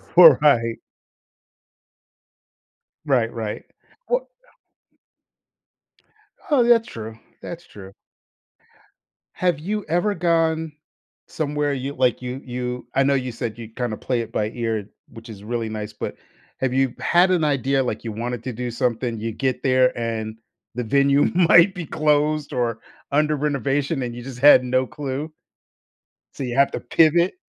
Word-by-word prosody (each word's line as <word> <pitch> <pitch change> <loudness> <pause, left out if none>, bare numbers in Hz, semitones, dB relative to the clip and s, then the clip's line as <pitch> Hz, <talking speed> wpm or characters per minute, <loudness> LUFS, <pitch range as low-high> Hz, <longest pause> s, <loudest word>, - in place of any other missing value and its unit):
Right. 145 -8 +6 2.3
Right, 125 -6 +2
right. 110 -2 -5 0.5
O - - 0 2.2
Oh, 275 -5 +4
that's 235 -1 +4
true, 110 0 -8 0.2
that's 175 0 -8
true. 95 -1 -12 1.4
Have 175 -5 0
you 205 +5 -3
ever 175 +6 +1
gone 160 -3 0 0.5
somewhere 150 -2 -2
you 135 +1 -4
like, 125 -1 +1
you 125 +1 -5
you 125 -1 -5
I 135 - +2
know 140 +1 +2
you 130 -2 -2
said 115 -1 -5
you'd 115 -1 -10
kinda 120 -4 -3
play 125 -2 -1
it 115 0 -8
by 105 -1 -1
ear, 110 -4 -3 0.2
which 115 +1 -13
is 100 -2 -10
really 115 0 -3
nice, 105 -1 -5
but - - -6 0.4
have 130 -1 0
you 135 -2 +1
had 180 +2 +3
an 175 -3 +2
idea, 135 -2 +1
like, 110 -3 -4
you 115 - -4
wanted 120 +2 -4
to 130 - -4
do 125 +2 -4
something, 120 -1 -1
you 115 +1 -3
get 130 +2 -2
there 130 -2 +3
and 110 -1 -3 0.4
the 125 - -2
venue 140 +4 +3
might 175 +1 +6
be 180 -3 -5
closed 150 0 0
or 120 -3 -1 0.3
under 150 +1 +2
renovation 140 0 -1
and 120 -1 -5
you 120 - -7
just 130 -2 -9
had 140 -2 +7
no 130 +1 +1
clue? 145 +4 -5 1.0
So - - -9
you 120 -2 -3
have 140 +1 +4
to - - -4
pivot? 170 - +3
130 Hz, 145 wpm, -22 LUFS, 115-150 Hz, 2.3 s, had